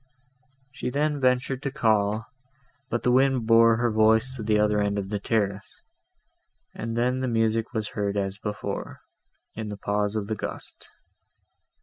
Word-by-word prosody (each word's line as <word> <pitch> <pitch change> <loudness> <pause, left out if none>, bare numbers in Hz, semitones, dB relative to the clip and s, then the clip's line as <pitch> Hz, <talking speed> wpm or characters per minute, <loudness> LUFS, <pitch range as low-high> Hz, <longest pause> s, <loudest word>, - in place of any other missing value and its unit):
She 130 -1 -4
then 145 +2 0
ventured 130 0 +1
to 140 - -2
call; 110 -4 +1 0.6
but 120 - -2
the 125 - +3
wind 130 -2 +3
bore 115 0 +6
her 120 0 +1
voice 110 +4 +3
to 120 - -7
the 105 0 +2
other 105 0 +2
end 100 0 0
of 95 -1 -3
the 105 -1 -2
terrace, 100 -2 -2 0.9
and 115 +1 -4
then 125 +2 +1
the 130 - -1
music 115 -1 0
was 110 -3 -3
heard 100 -1 -2
as 100 0 -2
before, 105 0 -5 0.5
in 110 -1 -5
the 105 - -6
pause 105 +1 -1
of 105 -2 -1
the 110 - -3
gust. - - -7
110 Hz, 160 wpm, -26 LUFS, 105-125 Hz, 0.9 s, bore